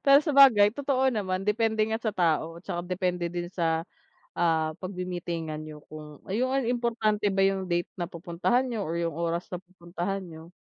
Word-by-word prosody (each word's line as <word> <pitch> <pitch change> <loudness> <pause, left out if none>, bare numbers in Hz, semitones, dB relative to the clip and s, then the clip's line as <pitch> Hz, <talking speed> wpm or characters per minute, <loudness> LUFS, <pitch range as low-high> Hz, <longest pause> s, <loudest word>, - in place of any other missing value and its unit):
Pero 275 0 +8
sabagay 265 -9 +7
totoo 265 0 +1
naman, 190 -4 -2
depende 220 +1 +1
nga 220 0 -1
sa 220 -2 -1
tao, 165 -1 +1
tsaka 175 - -3
depende 180 -1 -1
din 175 0 -4
sa, 165 -2 0 0.5
ah, 160 -2 +2
pagmi-meetingan 175 -4 -4
niyo, 155 -1 -9
kung 150 -1 -10
ayun 235 +7 0
ano 270 -1 +1
importante 230 -4 0
ba 195 - +1
'yung 195 -1 +1
date 175 -1 0
na 175 - -2
pupuntahan 175 +8 0
niyo 225 -5 -2
o 160 - -4
'yung 170 -2 -1
oras 170 +1 -2
na 180 - -3
pupuntahan 180 +1 -5
niyo. 165 0 -11
180 Hz, 175 wpm, -27 LUFS, 170-220 Hz, 0.5 s, Pero